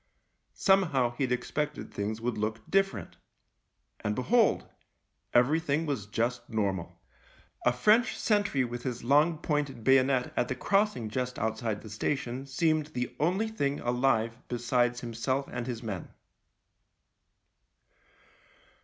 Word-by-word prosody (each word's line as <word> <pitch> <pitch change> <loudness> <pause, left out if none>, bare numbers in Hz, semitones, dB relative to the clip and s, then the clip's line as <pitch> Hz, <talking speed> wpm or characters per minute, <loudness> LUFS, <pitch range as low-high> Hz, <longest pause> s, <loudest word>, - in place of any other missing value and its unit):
Somehow 160 -11 +3
he'd 130 -3 0
expected 150 +4 -2
things 105 +2 -3
would 120 0 -1
look 110 +1 -3
different 195 0 0 0.4
— - - -49
and 105 0 0
behold! 225 - +2 0.6
everything 150 +5 +2
was 135 -10 -3
just 120 +3 -2
normal. 100 -6 -2 0.7
A - - +6
French 210 - +3
sentry 205 - +2
with 120 0 -4
his 125 -2 -4
THE - - -11
LIEUTENANT 145 +4 +6
n - - -2
long 155 - -12
pointed 145 -6 -1
bayonet 130 0 +3
at 120 - +1
the 130 - -2
crossing 195 - +1
just 125 +3 -3
outside 110 -1 -2
the 110 - -9
station 130 +3 -2
seemed 155 +2 +1
the 125 -5 -4
only 185 +9 +1
thing 145 -10 -1
alive 120 -2 +1
besides 120 0 0
himself 120 +4 -2
and 125 -1 -4
his 120 -2 -4
men. 100 -6 -5
125 Hz, 135 wpm, -29 LUFS, 115-150 Hz, 0.7 s, A